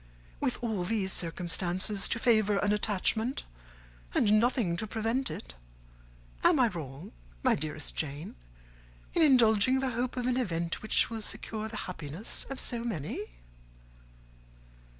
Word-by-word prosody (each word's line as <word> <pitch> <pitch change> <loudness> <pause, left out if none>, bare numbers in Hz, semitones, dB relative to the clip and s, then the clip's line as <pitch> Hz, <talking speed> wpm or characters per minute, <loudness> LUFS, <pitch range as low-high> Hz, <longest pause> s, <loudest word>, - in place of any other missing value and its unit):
With 125 - -1
all 215 -6 -1
these 190 0 0
circumstances 180 +3 0
to - - +1
favour 215 -4 +3
an 205 +1 +2
attachment, 220 +4 +1 0.7
and 215 -1 +5
nothing 230 -7 +2
to 220 - -2
prevent 225 +5 0
it, - - -7 0.9
am 335 -5 +5
I 245 -2 +5
wrong, 145 -6 -7 0.3
my - - +5
dearest 155 +1 -4
Jane, 145 +1 -3 0.8
in 340 - +3
indulging 255 -3 +5
the 265 -1 0
hope 245 +2 -2
of 245 - -1
an 250 0 +1
event 170 -8 -1
which 215 +1 +2
will 225 -1 -3
secure 215 +1 -3
the 220 -1 -7
happiness 165 +3 -4
of 270 - -4
so 235 -1 -2
many? 170 - -3
215 Hz, 135 wpm, -30 LUFS, 175-235 Hz, 0.9 s, and